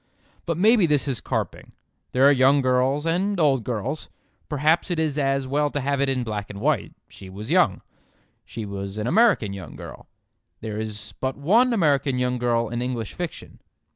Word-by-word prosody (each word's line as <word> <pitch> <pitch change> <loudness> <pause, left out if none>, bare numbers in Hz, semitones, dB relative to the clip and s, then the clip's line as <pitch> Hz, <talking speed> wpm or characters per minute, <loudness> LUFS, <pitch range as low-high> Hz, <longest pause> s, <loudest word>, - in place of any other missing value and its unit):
But 165 -2 -1
maybe 210 0 +5
this 150 -2 +2
is 130 -4 -1
carping. - - -4 0.4
There 130 +2 +4
are - - +7
young 135 +1 +4
girls 130 +4 +1
and 185 +4 0
old 135 -6 +3
girls. 120 +6 -4 0.4
Perhaps 155 +4 +1
it 175 - -1
is 155 -2 0
as 135 -1 0
well 145 +2 +1
to 145 - -3
have 140 +1 -1
it 140 - +2
in 130 -2 0
black 105 -3 -4
and 100 - -8
white; 140 0 0
she 95 - -12
was 105 +7 -7
young. 175 - +3 0.6
She 115 -2 -7
was 100 0 -6
an 105 - -2
American 175 - +3
young 95 -2 -9
girl. - - -10 0.5
There 110 -1 -5
is 110 -1 -6
but 130 0 -2
one 220 - +3
American 145 - +2
young 125 0 0
girl 120 -1 +1
in 120 0 -3
English 120 -4 -3
fiction. 175 -2 -7
135 Hz, 185 wpm, -24 LUFS, 115-155 Hz, 0.6 s, are